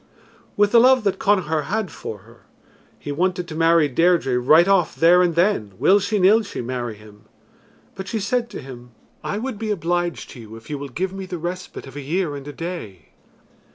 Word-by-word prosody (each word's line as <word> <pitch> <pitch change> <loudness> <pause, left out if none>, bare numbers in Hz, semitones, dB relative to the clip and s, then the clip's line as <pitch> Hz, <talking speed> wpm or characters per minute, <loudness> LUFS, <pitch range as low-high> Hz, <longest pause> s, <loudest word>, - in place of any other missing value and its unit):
With 205 0 +3
the 235 - +7
love 255 0 +5
that 200 -2 0
Connachar 160 -7 +1
had 215 +2 -2
for 110 - -7
her, - - -20 0.5
he 145 - -7
wanted 180 +3 -1
to 160 - -7
marry 165 -1 +3
Deirdre 155 -3 +2
right 155 +8 +5
off 195 -4 +2
there 175 +2 +5
and 175 -2 +1
then, 170 - +1
will 200 - +4
she 205 +2 -1
nill 200 +4 +5
she 205 - -7
marry 120 -2 -4
him. 105 0 -17 0.7
But 190 0 -8
she 225 - -2
said 235 +3 -1
to - - -8
him, 125 -2 -11 0.3
"I 200 - -3
would 230 -1 -5
be 220 -1 -3
obliged 175 -2 -2
to 130 - -11
you 110 -1 -11
if 115 +5 -12
you 145 - -3
will 140 0 -7
give 185 +8 -3
me 195 -1 -7
the 180 - -5
respite 175 +2 -6
of 135 - -12
a 145 - -5
year 155 +2 -2
and 140 0 -9
a - - -5
day." 145 - -7
170 Hz, 210 wpm, -21 LUFS, 135-195 Hz, 0.7 s, the